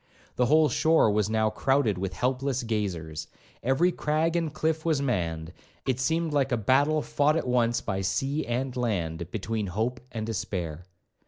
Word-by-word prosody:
The 125 Hz, -, +2 dB
whole 155 Hz, +3 st, +5 dB
shore 155 Hz, -3 st, +3 dB
was 105 Hz, 0 st, +1 dB
now 110 Hz, -1 st, +2 dB
crowded 120 Hz, -5 st, +1 dB
with 95 Hz, 0 st, -3 dB
helpless 130 Hz, +1 st, -1 dB
gazers, 90 Hz, -9 st, -3 dB, 0.3 s
every 135 Hz, +8 st, +3 dB
crag 160 Hz, +1 st, 0 dB
and 165 Hz, -3 st, 0 dB
cliff 160 Hz, +1 st, -1 dB
was 160 Hz, -4 st, +1 dB
manned; 85 Hz, -11 st, -2 dB, 0.3 s
it 130 Hz, -2 st, 0 dB
seemed 160 Hz, +4 st, 0 dB
like 140 Hz, -2 st, +1 dB
a 120 Hz, -, +2 dB
battle 140 Hz, +8 st, +2 dB
fought 150 Hz, +2 st, +2 dB
at -, -, -1 dB
once 120 Hz, -1 st, +2 dB
by 95 Hz, 0 st, -2 dB
sea 135 Hz, +11 st, 0 dB
and 125 Hz, +2 st, -2 dB
land, 85 Hz, -9 st, -2 dB
between 110 Hz, +1 st, -3 dB
hope 110 Hz, +7 st, -2 dB
and 110 Hz, -2 st, -4 dB
despair. 90 Hz, -6 st, -4 dB
120 Hz, 165 wpm, -27 LUFS, 100-145 Hz, 0.3 s, whole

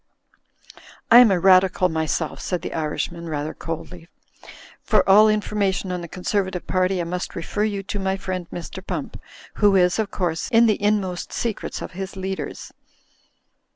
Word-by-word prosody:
'1 240 Hz, +2 st, +10 dB
am 245 Hz, -, +6 dB
a 190 Hz, -3 st, +2 dB
Radical 185 Hz, +1 st, +4 dB
myself," 160 Hz, -1 st, -2 dB
said 180 Hz, -3 st, -3 dB
the -, -, -5 dB
Irishman, 165 Hz, +2 st, -3 dB
rather 150 Hz, 0 st, -3 dB
coldly, 165 Hz, +1 st, -7 dB, 0.7 s
"for -, -, +2 dB
all 210 Hz, +3 st, +7 dB
information 205 Hz, -3 st, 0 dB
on 180 Hz, -1 st, -3 dB
the 170 Hz, -, -7 dB
Conservative 185 Hz, +1 st, -2 dB
party 185 Hz, 0 st, 0 dB
I -, -, 0 dB
must 180 Hz, +2 st, -4 dB
refer 205 Hz, +5 st, -2 dB
you 200 Hz, -2 st, -3 dB
to 205 Hz, +1 st, -4 dB
my 190 Hz, 0 st, -1 dB
friend, 185 Hz, -2 st, -4 dB
Mr. 175 Hz, -, -7 dB
Pump, -, -, -5 dB, 0.4 s
who 205 Hz, -1 st, +5 dB
is, 180 Hz, +2 st, +3 dB
of 215 Hz, -2 st, 0 dB
course, 175 Hz, -5 st, -2 dB
in 235 Hz, -1 st, +5 dB
the 215 Hz, -3 st, +1 dB
inmost 200 Hz, -4 st, -1 dB
secrets 230 Hz, -3 st, -3 dB
of -, -, -7 dB
his 190 Hz, +2 st, -6 dB
leaders. 190 Hz, 0 st, -5 dB
185 Hz, 160 wpm, -22 LUFS, 175-200 Hz, 0.7 s, 1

